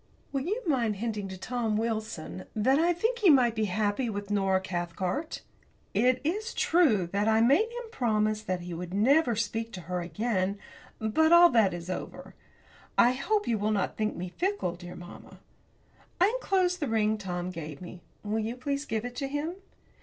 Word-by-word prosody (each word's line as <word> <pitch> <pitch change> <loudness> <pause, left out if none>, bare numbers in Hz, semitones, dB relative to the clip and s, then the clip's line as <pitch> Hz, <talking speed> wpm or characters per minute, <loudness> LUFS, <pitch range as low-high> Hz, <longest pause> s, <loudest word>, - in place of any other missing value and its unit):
Will 275 - -1
you 430 +8 -2
mind 235 -8 +1
hinting 210 -1 -3
to 190 0 -7
Tom 225 +2 -1
Wilson 215 - -3
that 260 +7 +3
I 340 +2 +3
think 450 +8 0
he 405 -5 +5
might 250 -6 +5
be 220 -1 0
happy 210 +5 0
with 205 -1 -5
Nora 195 -2 +2
Cathcart? 185 - -3 0.5
It 250 +5 +3
is 420 +9 -2
true 285 - +3
that 205 +2 +1
I 220 0 +4
made 280 - +4
him 475 -1 -8
promise 215 - +1
that 185 -4 -3
he 175 0 -6
would 180 +2 -5
never 250 +4 +4
speak 225 +1 -2
to 185 - -6
her 180 +1 -3
again, 190 +2 -1 0.4
but 270 +10 +2
all 345 0 +8
that 220 -5 +4
is 175 -1 -6
over. 185 - -6 0.6
I 240 - +6
hope 410 +12 0
you 225 -3 +1
will 210 +1 0
not 205 -4 0
think 215 -1 -1
me 180 +1 -5
fickle, 360 - -1
dear 175 0 -10
mamma. 175 0 -12 0.8
I 370 +3 +5
enclose 380 -7 +1
the 295 - -2
ring 215 -1 +1
Tom 180 -2 -4
gave 155 -4 -7
me. 180 0 -10 0.2
Will 215 +1 -1
you 225 +2 -3
please 280 +3 -3
give 225 -2 -2
it 245 0 -6
to 275 - -2
him? 290 +4 -3
220 Hz, 185 wpm, -28 LUFS, 190-280 Hz, 0.8 s, all